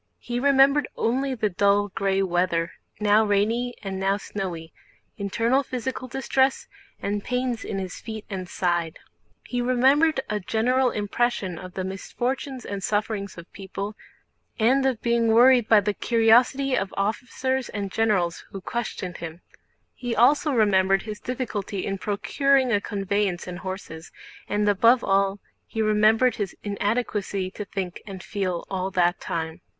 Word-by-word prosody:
He 240 0 -4
remembered 280 +2 +4
only 260 +3 0
the 215 -3 -1
dull 200 +2 +2
gray 195 0 0
weather 175 -2 0 0.3
now 210 +1 +4
rainy 220 +4 +1
and 190 -1 -4
now 195 +1 +1
snowy, 180 -5 -6 0.5
internal 230 +6 +1
physical 255 -1 -4
distress, 265 +1 0 0.3
and 200 0 -2
pains 250 -2 -2
in 200 - -4
his 185 -2 -5
feet 220 -2 -7
and 185 -3 -5
side. 175 -3 -1 0.5
He 245 -1 -2
remembered 265 +5 +3
a 210 -1 -1
general 250 +6 +1
impression 205 -4 -1
of 185 -1 -10
the 190 - -2
misfortunes 250 +7 -4
and 200 -1 -4
sufferings 205 -2 -2
of 170 +1 -12
people 200 +1 -6 0.6
and 255 +5 +3
of 250 -4 -2
being 235 -1 +2
worried 240 +1 +6
by 220 -2 +7
the 205 +1 -1
curiosity 240 +5 +3
of 195 -4 -1
officers 250 +5 -1
and 200 -2 -4
generals 190 -7 +1
who 195 - -7
questioned 190 -4 -4
him, 165 +1 -8 0.5
he 245 -2 -4
also 290 +6 +4
remembered 195 -5 +3
his 210 -1 -6
difficulty 215 -6 -4
in 195 -1 -3
procuring 260 +6 +1
a 205 -2 +2
conveyance 200 -3 -1
and 180 0 -6
horses, 185 -4 -7 0.4
and 210 0 0
above 230 +4 +4
all 195 0 +2 0.3
he 225 - -6
remembered 215 +3 +3
his 200 -3 -3
incapacity 205 -2 -1
to 210 - -6
think 185 -3 -5
and 190 -3 -8
feel 185 -4 -3
all 190 -1 -2
that 175 -2 +2
time. 160 +1 -4
210 Hz, 145 wpm, -25 LUFS, 195-245 Hz, 0.6 s, by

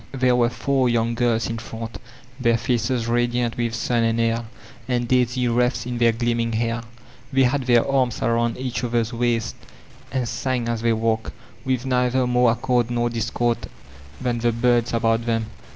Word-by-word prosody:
'' - - -28
There 125 -1 +5
were 120 -1 +3
four 125 +2 +1
young 115 0 +1
girls 115 -1 +1
in 115 0 -4
front, 115 0 -7 0.4
their 120 -2 +3
faces 120 0 0
radiant 120 0 0
with 120 -1 -1
sun 120 +1 0
and 115 0 +1
air, 115 0 +1 0.4
and 120 -1 0
daisy 125 0 +2
wreaths 120 +1 +1
in 120 -1 -4
their 120 -1 +5
gleaming 115 0 -1
hair; 115 +1 -1 0.5
they 135 -1 +4
had 130 +1 +1
their 120 -2 +4
arms 130 -4 +1
around 115 0 +1
each 125 -2 -3
other's 120 -1 0
waists 115 -1 0 0.6
and 130 -3 -1
sang 120 +1 -2
as 115 -1 -2
they 115 0 +2
walked, 110 0 -1 0.3
with 130 -1 -1
neither 125 0 +2
more 125 0 +3
accord 120 0 0
nor 120 0 0
discord 115 +1 -1 0.5
than 120 -2 -1
the 120 0 +2
birds 120 0 +2
about 115 0 +1
them. 115 -1 -1
120 Hz, 175 wpm, -23 LUFS, 115-125 Hz, 0.6 s, There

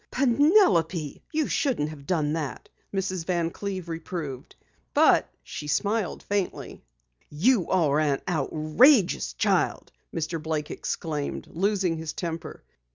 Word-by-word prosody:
"Penelope, 240 - +3
you 310 -2 0
shouldn't 240 - 0
have 140 -3 -11
done 155 -5 +1
that," 155 -4 -4 0.2
Mrs. 190 -3 -2
Van 170 -1 0
Cleve 190 -3 -5
reproved, 165 -5 -6 0.4
but - - +5
she 150 - -7
smiled 205 +6 -1
faintly. 200 -2 -3 0.5
"You 190 - +2
are 155 -6 +3
an 145 -3 +1
outrageous 160 - +3
child!" - - 0 0.2
Mr. 165 0 -3
Blake 155 -1 -3
exclaimed, 150 -3 -3
losing 190 -2 0
his 160 -1 -5
temper. 165 -2 -5
165 Hz, 115 wpm, -26 LUFS, 155-200 Hz, 0.5 s, but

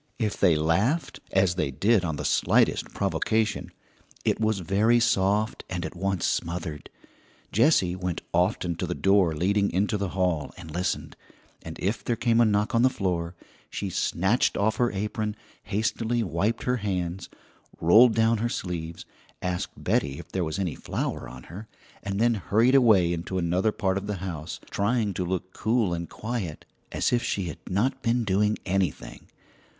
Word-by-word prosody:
If 110 -4 -1
they 90 -5 +5
laughed 95 - +1
as 95 -2 +3
they 90 -5 -1
did 100 - +2
on 80 -3 -2
the - - -5
slightest - - +2
provocation 110 -1 0 0.6
it - - +1
was 110 -3 +1
very 105 +7 +3
soft 105 -1 +1
and 90 -2 -3
at - - -6
once 95 -1 -1
smothered. 80 -3 -3 0.6
Jessie 105 - +3
went 90 -2 -3
often 90 0 +1
to 90 0 -2
the 90 - -2
door 95 -5 +3
leading 100 +5 +1
into 100 +3 0
the 100 -2 -1
hall, 90 -6 0
and 80 - -10
listened; 90 +3 -2 0.5
and 80 0 -8
if 105 +5 -1
there 120 - 0
came 115 0 +2
a - - +6
knock 105 +2 +1
on 115 - +3
the 130 - +5
floor, 90 -7 -2 0.3
she - - -4
snatched 95 +8 +1
off 110 +2 +1
her 120 -1 +2
apron, 105 +1 -3 0.3
hastily 110 +3 0
wiped 95 +5 -1
her 125 0 +1
hands, 95 -4 -3 0.5
rolled 110 +8 +6
down 115 0 +3
her 120 +2 0
sleeves, 85 -5 -5 0.3
asked 90 -1 -2
Betty 70 -1 0
if - - -11
there 95 - -1
was 80 -1 -3
any 95 -5 -1
flour - - -4
on 65 -1 -11
her, 100 +7 -10 0.3
and 100 0 -3
then 120 +1 +4
hurried 115 +4 +2
away 105 -10 +5
into 85 +2 -4
another 90 +4 +1
part 95 -2 0
of 100 - -9
the 105 - -2
house, 85 -4 -6
trying 105 0 0
to 90 - -2
look 95 +1 -3
cool 110 -4 +1
and 85 0 -4
quiet, 110 -9 -5 0.3
as - - 0
if 120 - +3
she 100 - -1
had 85 -4 -6
not 105 +8 0
been 120 0 +1
doing 105 +1 +1
anything. 90 -11 -2
95 Hz, 170 wpm, -26 LUFS, 90-110 Hz, 0.6 s, a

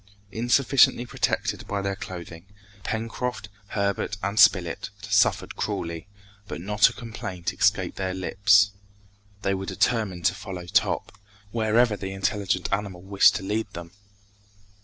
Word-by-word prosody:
Insufficiently 120 +3 +3
protected - - -2
by 100 - -2
their 100 0 -2
clothing, 85 -2 -9 0.4
Pencroft, 115 +1 -3 0.2
Herbert 100 0 -1
and 100 +2 -1
Spilett 95 -4 +4
suffered 100 -1 +1
cruelly, 85 0 -4 0.4
but - - -6
not 105 +3 +4
a - - -10
complaint 100 -7 -5
escaped 100 -3 +1
their 95 -1 -2
lips. 100 +2 +4 0.7
They 95 - +1
were 95 0 -4
determined 100 -8 0
to - - +4
follow 95 -3 -7
Top, 105 +2 +1 0.4
wherever 115 0 +2
the 95 -1 -6
intelligent 95 -1 -1
animal 100 -3 -3
wished 100 0 +5
to - - -3
lead 105 +3 -2
them. 85 0 -8
100 Hz, 130 wpm, -25 LUFS, 95-110 Hz, 0.7 s, wished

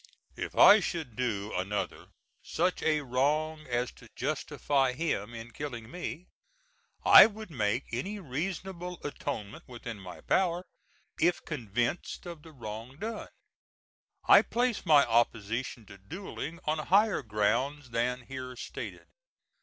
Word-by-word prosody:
If - - -5
I 210 - +9
should 160 - -4
do 110 -5 -2
another 100 +3 -3 0.3
such 180 - 0
a 155 -1 +2
wrong 150 +4 0
as 120 0 -1
to - - -17
justify 135 -3 0
him 125 -7 -2
in 115 +1 -8
killing 120 -3 -6
me, 180 -1 -5 0.8
I - - +11
would 215 -3 -9
make 115 -1 0
any 165 - -3
reasonable 180 +3 -4
atonement 115 -7 -5
within 115 -3 -7
my 95 -2 -10
power, 180 -1 +1 0.5
if 175 +2 +2
convinced 120 - -2
of 170 -3 -8
the 160 - -13
wrong 115 0 -8
done. 220 +4 -5 1.0
I - - +9
place 240 -5 -1
my 150 -3 +7
opposition 115 0 0
to 100 -1 -13
duelling 165 - -7
on 155 +1 0
higher 200 +6 +3
grounds 120 +5 0
than 125 +2 0
here 130 0 -7
stated. - - -7
135 Hz, 130 wpm, -30 LUFS, 115-170 Hz, 1.0 s, I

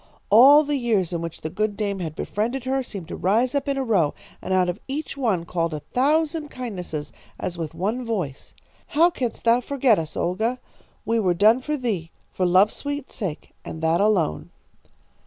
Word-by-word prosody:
All 275 +8 +8
the 290 -1 -1
years 215 -9 0
in 170 - -2
which 165 -1 -6
the 155 - -4
good 215 +1 -1
dame 200 -2 -2
had 160 -4 -4
befriended 235 - -2
her 265 +1 0
seemed 200 -9 -8
to - - -5
rise 225 +8 +1
up 280 -1 -1
in 280 -1 0
a 270 - 0
row, 195 - +2 0.3
and - - -5
out 185 -1 +3
of 180 +3 -3
each 285 +2 -4
one 220 -11 0
called 170 -2 -1
a 150 - -6
thousand 305 +4 +1
kindnesses 185 - -6 0.3
as 175 - -3
with 165 -2 -5
one 210 +9 -1
voice: 185 - -4 0.3
'How 340 +1 +4
canst 245 -7 -4
thou 235 +2 +4
forget 255 -5 +2
us, 160 -1 -6
Olga? 220 +8 -1 0.5
We 230 +1 +1
were 185 -5 +2
done 220 +7 +5
for 300 +3 -2
thee, 205 - -2 0.2
for 185 - +1
love's 185 +4 +4
sweet 285 -1 -5
sake, 185 -10 -5
and 160 - -7
that 165 +3 +3
alone.' 200 - +1
215 Hz, 195 wpm, -24 LUFS, 180-260 Hz, 0.5 s, All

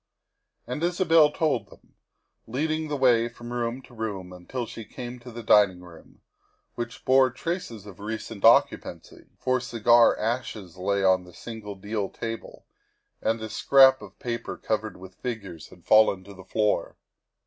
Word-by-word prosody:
And 125 +5 -5
Isabel 165 -3 +4
told 155 -1 0
them, - - -20 0.5
leading 155 +6 -1
the 150 -1 -2
way 120 -3 +4
from 120 +1 -9
room 120 +2 -3
to - - -17
room, 100 -5 -5
until 105 +8 -5
she 115 - -8
came 120 +3 -8
to 120 +1 -11
the 120 0 -8
dining 100 -4 +4
room, 85 -2 -16 0.5
which 120 -1 -6
bore 130 0 +5
traces 130 - -5
of 100 -3 -12
recent 105 0 -6
occupancy, - - +2
for 130 0 +1
cigar 120 -1 +4
ashes 110 -5 -3
lay 100 +2 -1
on 95 -1 +4
the 90 -1 -15
single 110 -3 -8
deal 100 +1 -3
table 115 0 -7 0.6
and 115 +1 0
a 110 - -5
scrap 135 -1 +6
of - - -12
paper 115 -2 -4
covered 110 0 -3
with 95 0 -14
fig 120 -4 -3
ures 85 -5 -10
had 90 -2 -18
fallen 110 -3 +5
to 100 - -12
the 95 -1 -13
floor. 105 +2 0
115 Hz, 160 wpm, -26 LUFS, 100-125 Hz, 0.6 s, scrap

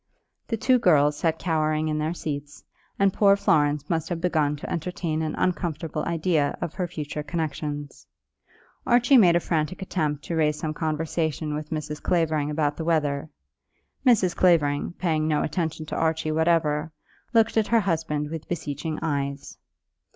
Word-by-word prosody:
The 225 - -1
two 255 +3 +3
girls 150 -9 +4
sat 160 +2 0
cowering 155 -2 0
in 155 0 -1
their 155 +3 -1
seats, 145 -3 -6 0.3
and 195 -1 +3
poor 200 -1 +5
Florence 150 -6 +2
must 165 -2 -1
have 175 -2 -2
begun 155 -4 +1
to 145 - -8
entertain 170 -2 -2
an 155 - -2
uncomfortable 165 -4 -2
idea 165 -3 0
of 170 -2 -4
her 180 -2 -2
future 150 -3 -5
connexions. 150 -2 -4 0.8
Archie 245 +2 +5
made 175 -5 +6
a - - +4
frantic 160 0 -1
attempt 155 -6 -2
to 170 - -4
raise 150 -2 +2
some 155 0 -3
conversation 155 -1 -2
with 150 0 -5
Mrs. 150 -1 -4
Clavering 155 -4 +1
about 150 -1 0
the 165 - -3
weather. 155 -2 0 0.7
Mrs. 215 -9 +3
Clavering, 155 -4 +2
paying 160 -4 0
no 150 -1 +1
attention 160 -2 -2
to - - -5
Archie 160 -1 0
whatever, 160 -1 +1 0.4
looked 225 -2 +3
at 220 -2 +2
her 230 -1 +3
husband 160 -5 -1
with 165 -2 -6
beseeching 155 -1 -3
eyes. 140 -2 -3
160 Hz, 160 wpm, -25 LUFS, 150-175 Hz, 0.8 s, made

